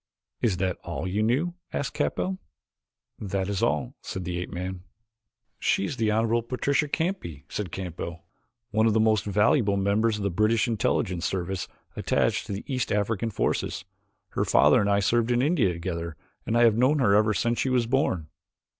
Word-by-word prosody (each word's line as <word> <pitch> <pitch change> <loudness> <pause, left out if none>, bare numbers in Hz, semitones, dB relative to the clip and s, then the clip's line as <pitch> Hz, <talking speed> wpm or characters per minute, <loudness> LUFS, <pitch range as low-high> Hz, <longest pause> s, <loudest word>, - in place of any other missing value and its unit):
"Is 105 -7 +1
that 95 -1 -1
all 85 0 -4
you 100 +4 0
knew?" 135 +11 +1 0.2
asked 140 - -2
Capell. 190 0 -1 0.8
"That 95 -2 -2
is 100 -2 -2
all," 70 -4 0
said 95 - -5
the 90 0 -3
ape 90 - -5
man. 90 +1 -5 0.8
"She 100 - +1
is 130 - -4
the 110 -1 +1
Honorable 115 +2 +2
Patricia 135 +5 0
Canby," 160 - -3
said 100 -5 -4
Capell, 85 -2 -5 0.5
"one 110 +1 +3
of 110 - +3
the 110 - +3
most 110 -2 +3
valuable 105 +1 +3
members 105 +3 +2
of 105 - -4
the 100 - 0
British 110 +5 +2
Intelligence 105 -5 0
Service 95 0 -3 0.3
attached - - 0
to - - -5
the 100 +1 -4
East 130 -4 -2
African 105 +2 0
forces. 95 -2 -1 0.4
Her - - -1
father - - +5
and 100 - +1
I 100 0 +3
served 115 +3 +2
in 120 +1 +2
India 145 - +3
together 85 -1 -4 0.3
and 115 - +1
I 120 - +5
have 115 -1 +4
known 135 +5 +4
her 120 -8 +3
ever 105 +1 +4
since 120 +2 0
she 135 - +1
was 125 -2 +2
born. 115 - 0
105 Hz, 180 wpm, -26 LUFS, 95-120 Hz, 0.8 s, father